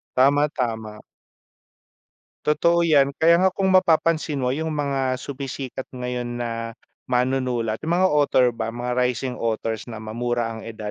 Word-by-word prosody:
Tama, 140 +3 +4
tama. 110 -4 -4 1.4
Totoo 170 +3 +3
'yan, 140 -4 +3
kaya 170 +1 +6
nga 190 0 +2
kung 190 -1 +1
mapapansin 160 -5 +2
mo 125 - +1
yung 155 +4 -2
mga 135 -3 0
sumisikat 135 -1 -6
ngayon 125 -1 -4
na 115 -1 -4 0.3
manunulat 125 -3 0
yung 165 - +1
mga 190 - +5
author 140 -4 +3
ba 115 -1 -4
mga 125 +1 -2
rising 125 0 -1
authors 110 -1 -2
na 110 -3 -8
mamura 120 +1 -2
ang 110 0 -8
edad. 110 -2 -6
125 Hz, 145 wpm, -23 LUFS, 115-145 Hz, 1.4 s, kaya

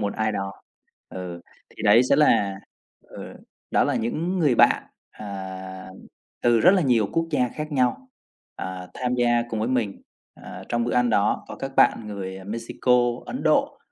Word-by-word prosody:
một 100 -1 -2
ai 110 0 0
đó. 95 -1 -3 0.6
Ừ, 90 -2 -7 0.3
thì - - -11
đấy 105 +3 +6
sẽ - - +4
là 100 -10 +3 0.5
ờ, - - -10 0.4
đó - - +3
là - - 0
những 165 +11 -2
người 145 -8 +3
bạn, - - +4 0.3
à, 95 -2 -8 0.5
từ 120 -1 +4
rất 180 - +7
là 190 -3 +3
nhiều 120 -6 +2
quốc 165 0 0
gia 125 -5 +1
khác 150 +3 -6
nhau, 135 - 0 0.5
à, 95 -1 -6
tham 125 -1 -2
gia 120 -1 +2
cùng 110 - -3
với 110 - -1
mình. 115 -6 -1 0.3
Ờ, - - -10
trong 120 0 0
bữa 120 - -2
ăn 125 -1 +2
đó 105 -1 +1
có - - -8
các 135 0 -6
bạn 110 - +4
người 95 -2 -6
Mexico, 115 +4 -2 0.3
Ấn 250 +1 -5
Độ, - - +2
115 Hz, 175 wpm, -24 LUFS, 100-125 Hz, 0.6 s, rất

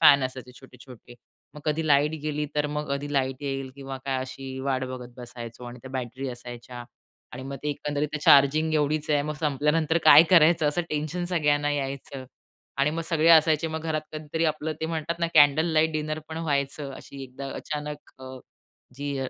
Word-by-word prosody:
Fan 140 -4 +7
असायचे 130 -1 -6
छोटे-छोटे. 125 -2 -14 0.4
मग 150 - -9
कधी 155 +1 0
लाईट 145 +1 +4
गेली, 150 0 -2
तर 150 0 +1
मग 150 0 -4
कधी 145 +1 -5
लाईट 135 0 -1
येईल 135 -1 -3
किंवा 135 -1 -6
काय 135 -1 -1
अशी 130 0 -7
वाट 130 -1 -1
बघत 125 -1 -8
बसायचो 120 -1 -9
आणि 120 +1 -9
त्या 130 - -10
बॅटरी 130 +1 -4
असायच्या 120 0 -8 0.5
आणि 130 - -7
मग 135 +1 -6
ते 150 - -2
एकंदरीत 145 +1 -2
चार्जिंग 155 +3 +5
एवढीच 150 0 0
आहे, 145 -1 +3
मग 150 +1 -3
संपल्यानंतर 150 +2 +1
काय 155 - +10
करायचं 165 -2 +5
असं 150 +4 0
टेन्शन 155 +4 -2
सगळ्यांना 145 -4 +1
यायचं. 135 -1 -4 0.5
आणि 140 +2 +2
मग 165 +2 -3
सगळे 165 0 +3
असायचे 160 -1 +5
मग 160 0 -4
घरात 160 -1 -1
कधीतरी 155 +2 -3
आपलं 155 0 -1
ते 160 - -1
म्हणतात 165 +1 -3
ना, 170 - +2
कॅन्डल 145 +2 +6
लाईट 160 0 +3
डिनर 155 0 -2
पण 160 0 -5
व्हायचं 140 -2 -2
अशी 140 -1 -10
एकदा 135 +1 -8
अचानक 150 -1 -6
अ, 130 0 -8 0.6
जी 140 0 -4
अ, 135 - -2
145 Hz, 185 wpm, -26 LUFS, 135-155 Hz, 0.6 s, काय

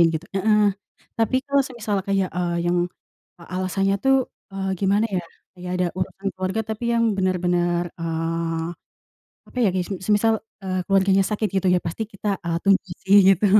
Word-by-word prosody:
gitu. 160 +3 -5
Heeh. 210 +1 +3 0.5
Tapi 225 +3 +2
kalau 280 0 +2
semisal 225 -5 -3
kayak, 195 -1 +1
eee, 175 -1 -1
yang 175 0 +2 0.5
alasannya 185 +3 -1
tuh, 270 0 +5 0.4
eee, 195 0 -1
gimana 200 +2 +2
ya, 185 - +1 0.4
kayak 180 0 -6
ada 180 0 +1
urusan 190 +1 -3
keluarga, 185 +4 -2
tapi 220 +2 -4
yang 230 - +3
bener-bener, 175 -2 +1 0.2
eee, 165 0 -2 0.8
apa - - -13
ya, 235 - +4
kayak 180 -1 0
se - - -3
semisal, 220 +1 +3 0.2
eee, 185 -1 -1
keluarganya 195 0 +4
sakit 215 0 0
gitu 190 -1 0
ya, 180 0 +4
pasti 170 +7 -3
kita, 200 -1 -3
eee, 170 -1 -1
tunjukin, 195 0 +3 0.2
gitu. 195 +3 0
190 Hz, 160 wpm, -23 LUFS, 180-205 Hz, 0.8 s, tuh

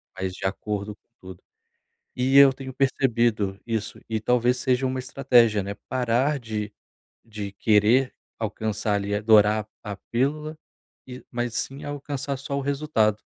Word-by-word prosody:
mais 95 0 -3
de 95 - -7
acordo 105 +1 -3
com - - -55
tudo. 95 -1 -11 0.7
E 130 +2 +2
eu 140 -1 +8
tenho 130 0 -8
percebido 115 -7 +1
isso 110 -3 -3
e 110 -1 -1
talvez 125 +2 +2
seja 130 0 +1
uma 130 0 -1
estratégia, 120 -5 +3
né? 100 +1 -4 0.2
Parar 130 +3 +1
de 110 -3 -4 0.5
de 105 -3 -7
querer 110 +6 +3 0.3
alcançar 110 -1 -2
ali, 100 0 -2
adorar 105 0 +4 0.2
a 105 -3 -5 0.2
pílula 150 +5 -1 0.5
e 125 0 -9
mas 120 -1 -2
sim 135 +1 -4
alcançar 145 -1 -4
só 140 +1 -4
o - - -1
resultado. 135 -7 0
120 Hz, 145 wpm, -25 LUFS, 105-135 Hz, 0.7 s, eu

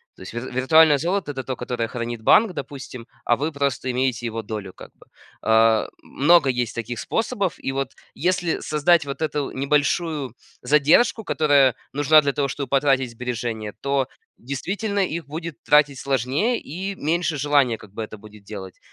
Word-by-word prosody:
То - - -17
есть 95 - -9
вир 120 +2 -5
виртуальное 150 +4 +5
золото- 175 +1 -1
это 135 -2 -5
то, 130 - -4
которое 120 -2 -3
хранит 120 -1 -5
банк, 205 - +5
допустим, 135 -5 -8 0.2
а 120 - +3
вы 150 +6 -2
просто 140 -3 -2
имеете 125 -1 -1
его 115 0 -4
долю 105 -3 -6
как - - -13
бы. - - -21 0.4
Э, 110 0 +4 0.2
много 150 -1 +4
есть 125 -2 -1
таких 115 0 -4
способов, 200 -6 -1
и 135 - 0
вот 135 -1 -2 0.2
если 180 0 0
создать 155 +1 +2
вот 140 +2 -6
эту 150 -3 -2
небольшую 145 0 0 0.3
задержку, 150 - +3
которая 140 -4 +4 0.2
нужна 150 +2 +5
для 140 -1 0
того, 140 0 0
чтобы 135 0 -4
потратить 135 -2 +2
сбережения, 115 -3 -4
то, 140 -2 0 0.3
действительно, 200 - -3
их 165 -3 -5
будет 160 +1 -7
тратить 145 -2 +4
сложнее 140 - 0
и 190 +6 -5
меньше 165 -1 -1
желания 140 -4 +2
как 105 - -15
бы 115 - -5
это 110 0 -9
будет 105 0 -15
делать. 95 -3 -9
140 Hz, 170 wpm, -23 LUFS, 120-155 Hz, 0.4 s, виртуальное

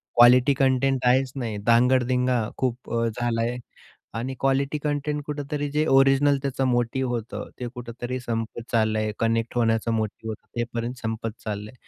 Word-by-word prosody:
Quality 125 +3 +7
content 130 -1 +1
आहेच 130 +1 +3
नाही, 115 -5 -3
दांगड 120 +4 +4
दिंगा 125 -1 +1 0.2
खूप 125 -1 -2 0.2
झालाय 115 +1 -1 0.6
आणि 125 +4 -3
क्वालिटी 135 +2 +1
कंटेंट 150 0 -1
कुठेतरी 145 0 -3
जे 150 +1 +1
ओरिजिनल 135 +1 +5
त्याच 135 -2 -3
मोटिव्ह 125 0 +1
होतं, 115 -1 -5
ते 125 - -3
कुठेतरी 120 +1 -5
संपत 115 -1 -4
चाललंय, 110 -2 +1
कनेक्ट 115 +1 0
होण्याचा 115 -1 +1
मोटिव्ह 110 0 -2
होत 110 - -10
ते 120 - +1
पर्यंत 120 +1 -3
संपत 110 0 -3
चाललंय. 105 +1 -5
125 Hz, 145 wpm, -25 LUFS, 115-135 Hz, 0.6 s, क्वालिटी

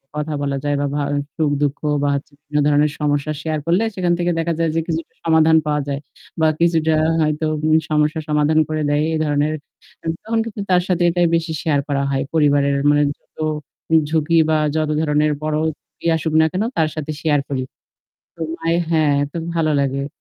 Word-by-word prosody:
কথা 150 +1 -3
বলা 140 -1 -1
যায় 145 0 0
বা - - 0
ভা 145 - 0 0.4
সুখ-দুঃখ 145 -2 0 0.2
বা 145 - +2 0.2
বিভিন্ন 145 +1 -7
ধরনের 150 0 +3
সমস্যা 145 0 0
শেয়ার 155 -1 -2
করলে 175 +6 +2
সেখান 180 -2 +1
থেকে 175 0 +1
দেখা 165 +1 0
যায় 165 -1 +2
যে - - +2
কিছুটা 165 +7 -3
সমাধান 160 0 +5
পাওয়া 150 -1 0
যায়। 140 -1 -2 0.4
বা 160 - +5
কিছুটা 165 -2 +2 0.3
হয়তো 155 0 0 0.4
সমস্যার 155 +1 +1
সমাধান 150 +1 +3
করে 155 0 -1
দেয় 145 +1 +2
এ - - +1
ধরনের। 150 +1 +1 0.5
আ - - -17 0.2
তখন 225 +1 -1
কিন্তু 215 -2 -6
তার 180 -1 +4
সাথে 180 -1 +1
এটাই 175 0 +2
বেশি 165 0 -1
শেয়ার 150 -3 +2
করা 140 -1 0
হয় 135 0 0
পরিবারের 145 -2 +3
মানে 145 0 +4 0.2
যত - - -44 0.7
ঝুঁকি 160 +1 +1
বা 155 - +3 0.2
যত 155 -1 0
ধরনের 150 -1 +2
বড় 155 0 0 0.3
ঝুঁকি - - -7
আসুক 160 -1 -2
না - - +4
কেন, 190 +3 -1
তার 160 -1 +2
সাথে 155 -1 -4
শেয়ার 150 -3 +2
করি। 135 -2 -1 0.7
তো 170 - -19 0.2
মায়ের 165 +1 0
হ্যাঁ, 155 -3 +3 0.2
তো - - -7 0.2
ভালো 160 -2 +1
লাগে। 140 0 -1
155 Hz, 185 wpm, -20 LUFS, 145-165 Hz, 0.7 s, সমাধান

